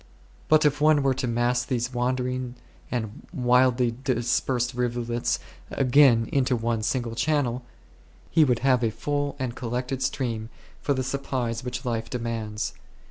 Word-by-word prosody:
But 155 0 +5
if 145 0 +2
one 150 -2 +5
were 135 -1 +3
to 130 -1 -2
mass 120 +1 +1
these 125 0 -2
wandering 125 0 -1 0.3
and 110 -4 -4
widely 125 -4 +3
dispersed 125 0 0
rivulets 120 -1 -1 0.3
again 130 -4 +4
into 130 -2 +2
one 115 -1 -1
single 120 +1 -1
channel, 130 0 0 0.7
he 160 - +5
would 125 -5 +2
have 130 -2 +4
a 115 - +3
full 145 +5 -2
and 130 -3 -3
col 120 - -5
lected 125 +2 -2
stream 115 -4 -2 0.3
for 140 - +1
the 130 - -1
supplies 130 -3 -2
which 125 0 -5
life 115 -2 -2
de 125 - -2
mands. 110 -3 -3
125 Hz, 150 wpm, -26 LUFS, 120-130 Hz, 0.7 s, But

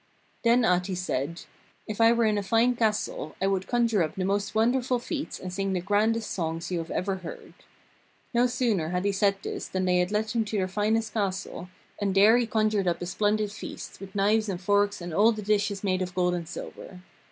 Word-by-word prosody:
Then 235 0 +4
Ahti 180 0 +1
said: 170 -2 -3 0.4
'If 215 +1 -3
I 225 0 +7
were 235 -1 +3
in 210 -1 +2
a - - -1
fine 230 +5 +2
castle 215 -8 -1
I 190 - 0
would 195 -1 0
conjure 235 -4 +2
up 155 - -1
the 190 - -2
most 200 +2 -1
wonderful 245 +3 +2
feasts 295 +5 -4
and 185 -1 -6
sing 195 0 -1
the 185 - 0
grandest 215 +4 +1
songs 165 -1 -3
you 175 - 0
have 165 - -6
ever 190 +1 -1
heard.' 175 -3 -9 0.8
No 240 +1 +4
sooner 225 -10 0
had 180 +2 -1
he 200 - +3
said 200 0 +2
this - - -4
than 185 0 -2
they 180 -1 +3
led 210 +2 -1
him 230 0 +1
to 210 0 -3
their 185 -1 +1
finest 215 +3 0
castle, 190 -3 -3 0.3
and 200 -2 0
there 210 +4 +7
he 240 - 0
conjured 215 -4 +1
up 170 -1 +1
a 175 - -4
splendid 210 +3 0
feast, 215 - -8
with 195 0 -10
knives 210 +2 +2
and 180 -3 -3
forks 205 +1 +1
and 175 -1 -6
all 215 +6 +5
the 215 -1 -6
dishes 205 -1 0
made 185 -2 0
of 180 0 -4
gold 180 -1 +2
and 170 -2 -4
silver. 180 +1 -8
200 Hz, 215 wpm, -27 LUFS, 185-220 Hz, 0.8 s, I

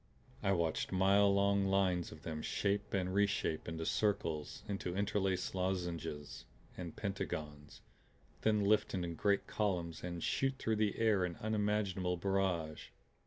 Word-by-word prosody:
I 95 - +2
watched 85 -3 0
mile 100 +2 +5
long 100 0 +3
lines 95 -3 +2
of 80 - -12
them 80 -1 -4
shape 100 +4 -1
and 95 -1 0
reshape 100 -5 +1
into 80 0 -3
circles, 85 -9 -1
into 95 -3 -3
interlaced 95 -2 0
lozenges 90 -5 -3 0.3
and 85 -3 -6
pentagons 75 -7 -5 0.6
then 105 -2 +3
lift 105 0 +3
in 85 -2 -2
great 100 +4 +1
columns 85 -6 -1
and 85 -1 -4
shoot 135 0 +1
through 110 -3 0
the 105 -1 +1
air 110 -4 +3
in 90 -1 -2
unimaginable 105 -4 0
barrage. 90 -4 -1
95 Hz, 135 wpm, -35 LUFS, 85-100 Hz, 0.6 s, mile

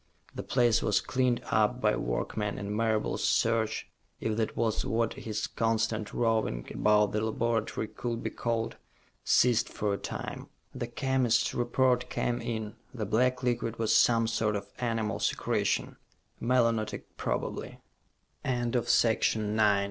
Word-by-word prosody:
The - - -4
place 120 -3 +2
was 105 - +2
cleaned 125 -2 0
up 110 +3 +2
by 105 -3 +2
workmen, 100 - -2
and 100 +1 -4
Marable's 110 -1 0
search 115 -1 +1 0.3
if 110 -1 -1
that 110 -1 -1
was 110 -2 +1
what 115 0 0
his 110 -1 -3
constant 115 -1 -1
roving 110 - 0
about 105 -1 +3
the 105 - 0
laboratory 110 0 -1
could 115 0 -4
be - - -2
called 115 -1 -2 0.5
ceased 120 -2 +3
for 105 -1 -1
a 100 - -3
time. - - -6 0.3
The - - -4
chemist's 125 -2 +1
report 125 +1 +1
came 120 0 -1
in. 110 -2 -4
The 110 -4 -4
black 125 +5 +1
liquid 120 -2 -1
was 115 -1 +1
some 115 -1 +5
sort 110 -2 0
of 100 - -5
animal 115 -3 -1
secretion, - - 0 0.4
melonotic 115 -3 +1
probably. - - -3
115 Hz, 130 wpm, -29 LUFS, 110-120 Hz, 0.5 s, some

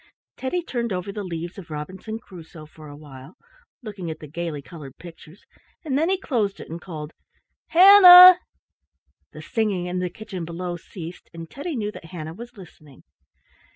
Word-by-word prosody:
Teddy 345 +7 -3
turned 235 -7 -4
over 185 +1 -4
the 205 +1 -6
leaves 175 +1 -7
of 175 - -13
Robinson 185 +8 -7
Crusoe 170 -7 -13
for 155 0 -15
a 145 - -11
while, 140 0 -14 0.5
looking 200 -6 -7
at 160 - -6
the 155 - -11
gaily 160 0 -5
colored 140 -2 -12
pictures, 170 +2 -15 0.4
and 275 -4 -2
then 320 +5 +1
he 385 - +1
closed 220 - -2
it - - -10
and 170 +1 -7
called, 155 -4 -8 0.5
"Hannah!" 365 -1 +9 0.9
The - - -11
singing 210 -7 -2
in 180 +1 -3
the 180 0 -2
kitchen 205 -3 -8
below 175 +1 -5
ceased, 170 0 -11
and 165 0 -8
Teddy 285 - -6
knew 210 -3 -3
that 190 - -12
Hannah 160 -2 -8
was 240 +5 -12
listening. 155 -7 -16
180 Hz, 170 wpm, -23 LUFS, 160-225 Hz, 0.9 s, Hannah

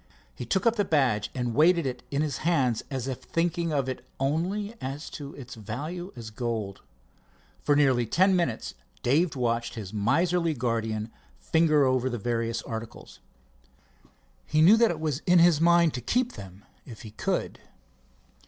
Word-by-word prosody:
He 120 - -8
took 190 - 0
up 230 0 +3
the 205 - +3
badge 130 - +1
and 120 -2 -2
weighted 170 +4 +4
it 125 -1 -3
in 145 +2 0
his 145 -4 -2
hands 135 -9 +1
as 130 -2 -4
if 130 -2 -4
thinking 170 0 -1
of 140 -3 0
it 130 -2 -5 0.2
only 180 +10 -1
as 135 +3 -5
to 145 -1 -8
its 130 -2 -9
value 150 - -6
as 115 -3 -8
gold. 110 -4 -4 0.8
For 145 - +2
nearly 130 -5 +3
ten 185 - +3
minutes 170 -11 -1 0.3
Dave 150 +7 +2
watched 120 -2 -1
his 105 -4 -7
miserly 165 - +1
guardian 115 -3 -2 0.3
finger 155 -3 +3
over 130 0 +1
the 120 - -3
various 115 +1 -2
articles. 115 0 -8 1.3
He 155 - +1
knew 195 +7 +8
that 230 0 +4
it 165 - -3
was 155 -4 -1
in 180 0 +6
his 170 -2 +5
mind 170 -1 +4
to 125 - -4
keep 250 - 0
them 95 +1 -11 0.2
if 115 -4 -11
he 110 - -9
could. 110 - -2
135 Hz, 165 wpm, -27 LUFS, 115-170 Hz, 1.3 s, knew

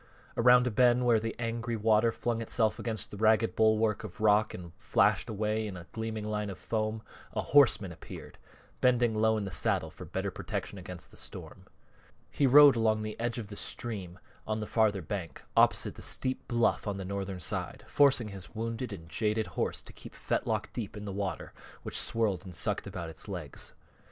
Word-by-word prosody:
Around 125 +1 +6
a 125 - 0
bend 125 +2 +4
where 115 -2 +5
the 115 +1 -4
angry 115 0 -2
water 110 +1 +3
flung 115 0 -2
itself 110 -1 0
against 110 -2 -4
the 105 - -7
ragged 110 +1 +3
bulwark 110 -1 +3
of 105 -5 -9
rock 105 0 +4
and 85 -2 -9
flashed - - +2
away 110 +1 -1
in 95 -3 -6
a 85 - -10
gleaming 110 -1 -4
line 105 -1 -2
of 95 - -6
foam, 110 -1 -2 0.3
a - - 0
horseman 120 -9 +4
appeared, 80 - -11 0.4
bending 120 -2 +3
low 110 0 +2
in 105 - -2
the 95 - -5
saddle - - +1
for - - -10
better - - -3
protection - - -5
against - - -9
the - - -15
storm. - - -8 0.6
He 140 - +2
rode 145 +1 +9
along 110 -1 +2
the 110 0 -4
edge 120 +1 -1
of 110 -4 -6
the 100 - -8
stream 100 -6 -4 0.3
on 110 0 -1
the 105 - -3
farther 105 -4 +1
bank, 95 -3 -5
opposite - - +4
the - - -12
steep 130 0 -1
bluff 120 -2 +1
on 100 -1 -2
the 95 - -5
northern 95 -1 -4
side, 80 - -4
forcing 135 -6 +3
his 100 +1 -9
wounded 115 +2 -3
and 80 -5 -8
jaded 105 +4 0
horse - - -2
to - - -11
keep - - -12
fetlock - - -2
deep 110 -3 -5
in 105 - -7
the 100 - -5
water 100 -1 -4 0.3
which - - -6
swirled 105 -6 0
and 90 -3 -9
sucked - - -1
about 85 -1 -5
its 80 - -3
legs. 90 -8 -6
110 Hz, 195 wpm, -30 LUFS, 100-115 Hz, 0.6 s, rode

